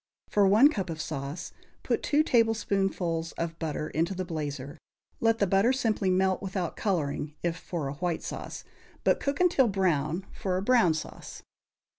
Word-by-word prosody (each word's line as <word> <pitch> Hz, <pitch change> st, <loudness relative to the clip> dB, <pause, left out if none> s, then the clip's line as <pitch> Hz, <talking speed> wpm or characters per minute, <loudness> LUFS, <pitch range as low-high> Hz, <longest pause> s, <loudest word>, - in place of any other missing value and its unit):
For 205 Hz, -1 st, +4 dB
one 220 Hz, +9 st, +7 dB
cup 195 Hz, -, -3 dB
of 160 Hz, -1 st, -5 dB
sauce, 155 Hz, +1 st, -5 dB, 0.3 s
put -, -, 0 dB
two 300 Hz, +1 st, +3 dB
tablespoonfuls 195 Hz, -, +1 dB
of 165 Hz, 0 st, -4 dB
butter 155 Hz, -2 st, -2 dB
into 170 Hz, +5 st, -1 dB
the 185 Hz, 0 st, -3 dB
blazer; 145 Hz, -3 st, -5 dB, 0.4 s
let 225 Hz, 0 st, +3 dB
the 205 Hz, -, +2 dB
butter 195 Hz, +6 st, +3 dB
simply 225 Hz, -7 st, 0 dB
melt, 185 Hz, 0 st, +2 dB
without 190 Hz, -3 st, -3 dB
coloring, 150 Hz, -6 st, -1 dB
if 170 Hz, -1 st, 0 dB
for 165 Hz, -3 st, -4 dB
a 135 Hz, -, -3 dB
white 170 Hz, +2 st, -2 dB
sauce, -, -, -6 dB, 0.4 s
but -, -, +3 dB
cook 280 Hz, 0 st, -2 dB
until 350 Hz, -8 st, +4 dB
brown 180 Hz, -3 st, 0 dB
for 185 Hz, -2 st, -2 dB
a -, -, -1 dB
brown 220 Hz, -8 st, +4 dB
sauce. 155 Hz, -, -8 dB
185 Hz, 165 wpm, -28 LUFS, 160-210 Hz, 0.4 s, one